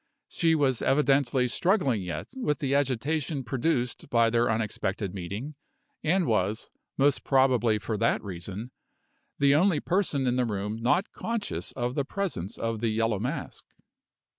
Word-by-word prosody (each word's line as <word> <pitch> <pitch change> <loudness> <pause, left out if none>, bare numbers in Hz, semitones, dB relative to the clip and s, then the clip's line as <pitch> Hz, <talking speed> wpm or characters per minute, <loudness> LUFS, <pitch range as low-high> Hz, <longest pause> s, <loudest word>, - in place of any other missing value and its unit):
She 165 -1 +2
was 135 -5 +1
evidently 135 -3 +2
struggling 140 - +2
yet 85 -4 -5
with 195 - -1
the 140 -1 -1
agitation 140 +2 0
produced 125 0 -1
by 115 -1 +3
their 120 +1 +2
unexpected 105 -3 -2
meeting, 100 - -5 0.5
and 175 +3 +2
was, 110 -2 0 0.3
most 140 0 +2
probably 125 -5 +3
for 110 +1 -3
that 115 - +1
reason, 100 +5 -6 0.7
the 140 0 +4
only 165 +1 +3
person 170 -6 0
in 125 0 +1
the 125 - +2
room 105 0 -3
not 130 +12 +1
conscious 230 -2 -3
of 120 -1 -2
the 140 - 0
presence 145 - -4
of 115 -1 -2
the 115 0 0
Yellow 110 -1 0
Mask. 135 +7 -4
125 Hz, 145 wpm, -27 LUFS, 110-145 Hz, 0.7 s, the